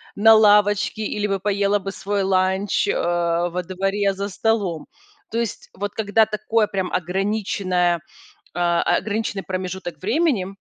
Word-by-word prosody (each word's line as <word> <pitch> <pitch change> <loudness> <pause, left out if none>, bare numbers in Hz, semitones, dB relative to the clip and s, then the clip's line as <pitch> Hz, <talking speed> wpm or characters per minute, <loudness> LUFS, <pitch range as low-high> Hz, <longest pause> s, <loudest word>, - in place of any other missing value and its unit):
на 220 +2 +7
лавочке 210 0 +3
или 210 0 -2
бы 195 -1 -1
поела 200 +1 +1
бы 195 0 -5
свой 200 +1 -2
ланч, 190 +1 +1
э, - - +1
во 175 +1 0
дворе 195 +2 -1
за 200 +1 -4
столом. 200 -6 -1 0.4
То 230 - -1
есть 230 -3 -4
вот 205 +1 -4
когда 220 +1 +2
такое 215 +1 0
прям 190 -2 -3
ограниченное, 185 -1 0 0.6
а, 175 -1 +1
э, - - +2
ограниченный 210 -2 -3
промежуток 185 -3 -5
времени 235 - +1
200 Hz, 140 wpm, -22 LUFS, 185-210 Hz, 0.6 s, на